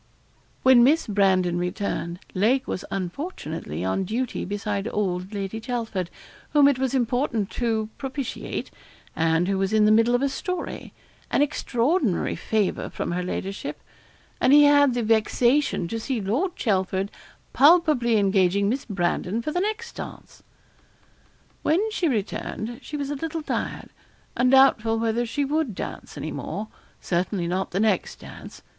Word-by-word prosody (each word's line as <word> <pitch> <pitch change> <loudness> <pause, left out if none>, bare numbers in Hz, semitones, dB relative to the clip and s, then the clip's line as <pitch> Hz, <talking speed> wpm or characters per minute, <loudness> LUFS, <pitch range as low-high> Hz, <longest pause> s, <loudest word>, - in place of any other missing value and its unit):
When 255 -2 +7
Miss 300 +6 +4
Brandon 190 -4 +2
returned, 180 -1 -3
Lake 235 +8 +2
was - - -3
unfortunately 175 - -4
on 95 - 0
duty 235 +6 -2
beside 205 +1 -3
old 185 -2 -2
Lady 205 +1 -4
Chelford, 225 -7 -3 0.4
whom 290 -2 +6
it 280 -3 +2
was 265 0 0
important 240 -4 0
to 225 -3 -1
propitiate, 270 -1 -4 0.4
and 165 +2 +2
who 195 -1 0
was 195 0 0
in 215 -1 +4
the 210 - +5
middle 230 +2 +4
of 245 - +1
a 280 - +2
story 365 +4 -5 0.4
an 285 - +3
extraordinary 265 - 0
favour 215 -3 -1
from - - -4
her 180 +1 -1
ladyship; 190 +2 -4 0.6
and 255 - +4
he 295 0 +8
had 285 -3 +5
the 240 - 0
vexation 230 0 +2
to 225 - -3
see 250 +1 -2
Lord 250 - -1
Chelford 190 -2 0 0.4
palpably 285 -6 +5
engaging 200 0 +2
Miss 260 +4 -2
Brandon 190 +1 -1
for 305 - -2
the 355 - 0
next 435 +3 -3
dance. - - -9 1.2
When 390 +8 +1
she 365 -5 0
returned, 230 0 -3
she 300 - -6
was 285 0 -3
a - - -2
little 325 +2 -4
tired, - - -4 0.4
and 250 +1 +3
doubtful 240 -4 +5
whether 230 +1 0
she 285 +5 -1
would 290 -6 -1
dance - - -7
any - - -4
more 215 +1 -5 0.3
certainly 180 +1 -1
not 185 +3 -1
the 190 - -2
next 210 -4 +1
dance. - - -11
225 Hz, 150 wpm, -24 LUFS, 195-270 Hz, 1.2 s, he